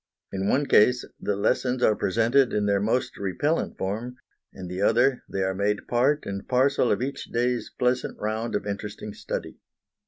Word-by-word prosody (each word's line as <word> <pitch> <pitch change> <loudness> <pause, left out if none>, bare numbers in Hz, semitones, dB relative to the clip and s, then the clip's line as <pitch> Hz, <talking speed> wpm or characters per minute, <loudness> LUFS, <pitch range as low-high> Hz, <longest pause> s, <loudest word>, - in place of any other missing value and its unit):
In 95 0 -2
the - - +1
one 145 +2 +2
case 125 0 +4
the 105 - -1
lessons 125 +5 0
are 110 - +4
presented 115 +7 +2
in 105 -1 +1
their 100 -1 +2
most 110 +5 0
repellent 100 - -1
form, 110 +6 -3 0.4
in 95 -1 -8
the 90 +2 -4
other 120 +5 +3
they 95 - -1
are 95 0 0
made 100 +2 -1
part 135 +5 +2
and 100 0 -5
parcel 130 0 +2
of - - +1
each 140 +1 -4
day's 120 +1 -1
pleasant 125 0 0
round 110 +2 -2
of 105 - -2
interesting 105 +1 -5
study. - - -6
115 Hz, 180 wpm, -26 LUFS, 100-125 Hz, 0.4 s, case